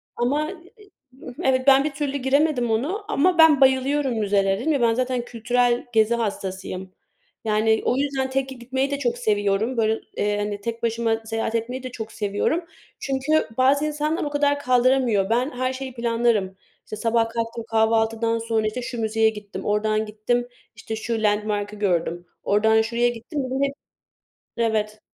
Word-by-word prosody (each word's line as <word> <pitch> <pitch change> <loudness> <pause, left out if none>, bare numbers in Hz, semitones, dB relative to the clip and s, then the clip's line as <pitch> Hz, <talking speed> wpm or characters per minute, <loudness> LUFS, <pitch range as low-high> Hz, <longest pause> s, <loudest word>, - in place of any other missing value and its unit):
Ama 290 +7 0 0.3
i 410 - -18 0.5
evet, 260 0 +1
ben 270 0 +7
bir 305 - -1
türlü 280 0 -2
giremedim 265 -2 +1
ona. 315 - -1
Ama 350 +5 +2
ben 320 -4 +6
bayılıyorum 265 +1 +3
müzelere. 195 -2 +1
Dedim 315 +7 0
ya, 280 -4 +1
ben 230 -1 +4
zaten 255 +1 -1
kültürel 245 +1 0
gezi 220 +1 +3
hastasıyım. 190 -4 -4 0.5
Yani, 220 +1 +2
o 250 - +2
yüzden 270 -1 -1
tek 265 0 -1
gitmeyi 265 +2 -3
de 280 - -2
çok 240 -3 -1
seviyorum. 210 +1 0
Böyle, 220 0 +1 0.2
eee, 205 0 0
hani 205 0 -3
tek 230 +2 -5
başıma 230 -1 0
seyahat 225 0 -2
etmeyi 245 +3 -3
de 255 - -6
çok 225 -3 -7
seviyorum 210 - -1 0.3
çünkü 275 +3 0
bazı 275 +3 +3
insanlar 305 +1 -1
o 295 - -2
kadar 285 0 +1
kaldıramıyor. 250 -6 +2
Ben 245 +5 +1
her 255 +1 -1
şeyi 260 0 -6
planlarım. 230 -5 0 0.3
İşte, - - -6
sabah 230 +1 +1
kalktım, 230 0 -4
kahvaltıdan 225 +1 +2
sonra, 225 -1 0
işte, 215 +4 -3
şu 240 -1 -5
müzeye 220 0 +2
gittim, 210 -2 -8
oradan 215 +1 +1
gittim 220 +3 -1 0.3
işte 220 +1 -6
şu 220 0 -3
landmark'ı 210 0 0
gördüm, 175 -4 -1 0.2
oradan 220 +2 +3
şuraya 235 +2 +1
gittim. 240 +6 -6
Bir - - -6
de 265 +2 +1
hep 275 - -6 0.8
Evet. 215 -2 -1
235 Hz, 165 wpm, -23 LUFS, 220-265 Hz, 0.8 s, ben